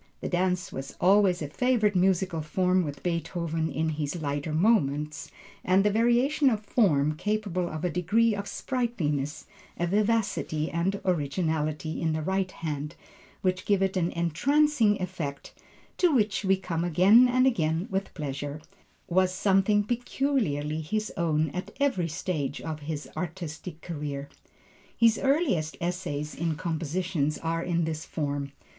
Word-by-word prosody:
The - - -4
dance 180 0 0
was 135 +1 -6
always 190 -3 +4
a - - -3
favorite 220 - +1
musical 185 -2 +2
form 180 +4 +1
with 145 -3 -6
Beethoven 170 -2 -2
in 160 +3 0
his 155 +2 -3
lighter 145 0 -2
moments, 155 -5 +1 0.3
and 185 +2 +4
the 210 - +4
variation 240 +4 +3
form, 160 - +2
capable 200 -3 -1
of 155 +3 -4
a - - +2
degree 210 +7 +2
of 200 0 -4
sprightliness, 155 - -2 0.3
vivacity 195 -4 0
and 185 +4 0
originality 155 -2 -1
in 160 -1 +1
the 155 0 -2
right 190 +2 0
hands 150 -3 -5 0.5
which 185 0 0
give 200 -2 +2
it 190 0 0
an 175 -2 +1
entrancing 225 - +2
effect, 165 -7 -5 0.5
to 355 -2 +4
which 215 -6 +1
we 195 0 +3
come 170 -3 -3
again 190 +9 +6
and 255 +1 +3
again 165 -6 +1
with 195 +1 -2
pleasure, 145 -1 -4 0.5
was 185 +1 +2
something 195 +2 +3
peculiarly 220 - -1
his 215 +7 -2
own 155 -4 +1
at 180 +3 -6
every 260 -12 +1
stage 150 -4 -3
of 160 -1 -5
his 150 0 -5
artistic 165 -1 -6
career. 145 -4 -5 0.7
His 230 -1 +4
earliest 270 - +1
essays 170 -4 -3
in 165 -1 -2
composition 165 -1 -1
are 165 0 -1
in 170 -1 0
this 160 -1 -3
form. 145 -2 -3
175 Hz, 140 wpm, -27 LUFS, 155-205 Hz, 0.7 s, again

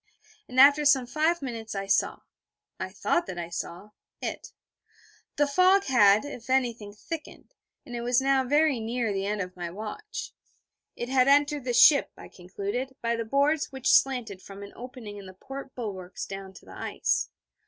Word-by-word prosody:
And 255 +1 -1
after 285 +2 +7
some 275 -3 +4
five 310 +5 0
minutes 225 -4 -5
I 195 0 -3
saw 195 - +1 0.6
I - - -4
thought 345 - -1
that 175 - -6
I 170 -1 -5
saw 175 +3 -6 0.3
it. - - -5 0.8
The 290 - +3
fog 370 +7 +4
had, 215 - +4
if 255 -4 -9
anything 240 -5 0
thickened; 305 +9 -9 0.3
and 245 - -8
it 235 - -3
was 245 +1 +2
now 270 0 +2
very 290 0 +2
near 225 -1 -2
the 195 0 -2
end 210 0 -1
of 180 -1 -6
my 175 -1 -5
watch. 420 - -7 0.6
It 240 - -5
had 260 -1 +3
entered 290 -1 +3
the 245 - -1
ship, 280 +4 +7
I - - -11
concluded, 200 +8 -5
by 235 0 +1
the 230 0 -3
boards 285 +6 +1
which 265 -1 +1
slanted 240 -8 +2
from 200 +1 -10
an 200 - -11
opening 240 -4 -9
in 200 -1 -10
the 185 - -12
port 270 +6 -9
bulwarks 195 -6 -6
down 195 -1 -8
to - - -14
the - - -12
ice. - - -1
245 Hz, 180 wpm, -27 LUFS, 205-280 Hz, 0.8 s, after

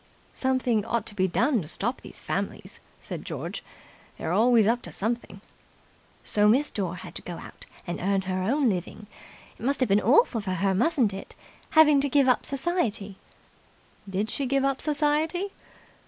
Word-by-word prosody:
"Something 255 -4 +1
ought 230 0 -1
to - - -6
be 190 -2 +2
done 240 - +1
to 155 - -8
stop 235 +10 -2
these - - -11
families," - - -4 0.2
said - - -7
George. - - -6 0.5
"They're 160 - -3
always 225 +3 +4
up 235 +3 +2
to - - -8
something." 220 -2 -3 0.8
"So 210 0 +2
Miss 265 +7 +3
Dore 185 -4 -3
had - - -10
to - - -5
go 175 - -7
out - - -11 0.2
and 175 - -4
earn 195 +1 +1
her 185 0 -2
own 265 +8 +1
living. 195 +1 -3 0.5
It - - -11
must 275 +3 +2
have 255 - +2
been 200 +2 +4
awful 245 - +4
for 190 -2 -3
her, 190 +2 +1
mustn't 235 - +2
it, 195 - -9 0.4
having 300 -3 +7
to 285 - +1
give 275 0 +3
up 255 - +2
society." 265 - -2 0.9
"Did 200 +3 -1
she 275 - -1
give 275 +1 +1
up 275 -1 0
society?" 310 +6 0
235 Hz, 175 wpm, -26 LUFS, 195-275 Hz, 0.9 s, having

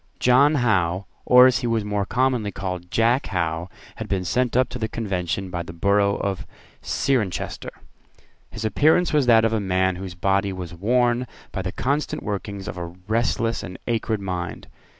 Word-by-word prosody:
John 140 +5 +5
Howe, 95 - +1 0.2
or, 125 0 +8
as 130 -2 +4
he 125 - -2
was 115 -2 0
more 105 -1 -1
commonly 125 -5 +1
called, 90 -2 -5
Jack 120 +6 +2
Howe, 85 -1 -2 0.3
had - - -6
been 95 -2 -1
sent 125 +6 +1
up 130 - +4
to 125 - -6
the 110 - -1
Convention 95 -4 -3
by 85 -1 -3
the 85 - -8
borough 100 +3 +2
of 100 -2 -3 0.3
Cirencester. 120 -9 -1 0.8
His 110 - -6
appearance 155 +10 +3
was 145 -4 +3
that 115 -2 +6
of 115 - +1
a 110 - +1
man 95 -1 +1
whose 95 -1 -7
body 100 +2 +1
was 90 -2 -6
worn 120 +6 +1 0.2
by 95 - -3
the 95 0 -3
constant 140 +8 -2
workings 100 -1 -4
of - - -5
a 85 -1 -4
restless 110 +5 -1
and 90 - -8
acrid 110 -2 -1
mind. 90 -3 -4
100 Hz, 175 wpm, -23 LUFS, 95-120 Hz, 0.8 s, or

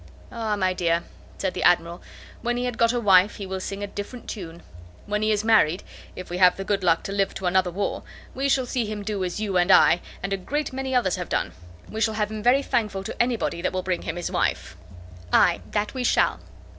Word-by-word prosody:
"Ah! 225 -2 -2
my 185 -2 +1
dear," 170 -2 0 0.3
said 190 -2 -2
the - - -4
Admiral, 175 0 +2 0.4
"when 240 +1 -1
he 245 - -1
had 245 -2 -2
got 230 0 +4
a 245 - -1
wife, 195 -2 +5
he 200 - -6
will 190 0 -4
sing 195 +2 -5
a - - 0
different 205 +4 -8
tune. 170 -4 -7 0.4
When 210 0 -1
he 215 0 +2
is 210 0 +1
married, 205 -6 +3 0.3
if 185 - -8
we 180 - -3
have 180 -1 +6
the 195 - -4
good 195 -1 -1
luck 165 -2 +3
to - - -5
live 195 -1 0
to 190 - -5
another 185 0 +2
war, 195 +3 -3 0.3
we 275 +2 -1
shall 265 -2 +2
see 240 -2 -2
him 210 -1 -5
do 200 -2 -2
as 180 +2 -3
you 200 -3 -1
and 175 +1 +2
I, 180 -2 +6 0.2
and 195 +1 -2
a - - 0
great 290 +9 -3
many 265 0 -2
others, 195 -8 +2
have - - -5
done. - - -1 0.4
We 220 - -5
shall 220 0 +1
have 210 0 -1
him 215 -1 -5
very 255 +5 +4
thankful 210 -7 -1
to - - -3
anybody 240 -8 -1
that 185 - -1
will 185 0 -2
bring 185 -2 -1
him - - -4
his 175 - -4
wife." - - -1 0.6
"Ay, 175 - +4
that 210 0 -1
we 260 -2 -3
shall." - - +2
200 Hz, 240 wpm, -24 LUFS, 185-225 Hz, 0.6 s, have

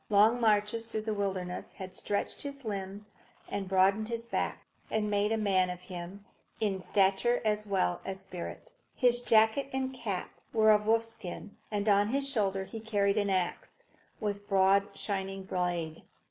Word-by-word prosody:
Long 215 +4 +5
marches 215 +1 +2
through 220 -1 -3
the 220 -1 -1
wilderness 190 -3 -3
had 185 -1 -8
stretched 200 +2 -2
his 280 -2 -5
limbs 200 0 -5 0.4
and 195 -1 -3
broadened 195 +3 +3
his 230 0 -3
back, - - -2 0.2
and 210 -1 0
made 205 +1 +2
a 225 - +2
man 190 -4 +2
of 180 -1 -5
him 180 +2 -8 0.3
in 200 -3 0
stature 200 +6 +3
as 210 0 +1
well 185 -3 +1
as 190 0 -4
in 190 - -16
spirit. 190 - -7 0.2
His 245 -2 +3
jacket 225 +4 +4
and 265 0 -2
cap 205 -8 -4 0.2
were 220 -1 +6
of 210 0 +3
wolfskin, 220 -4 -1 0.2
and 205 0 -2
on 205 0 +5
his 275 +4 0
shoulder 200 -7 0
he 225 +4 -7
carried 205 -2 +1
an 205 -1 0
axe, 185 -2 -2 0.4
with 205 -1 -3
broad, 195 0 +4
shining 195 -1 -3
blade. 175 -4 -2
205 Hz, 165 wpm, -31 LUFS, 190-220 Hz, 0.4 s, were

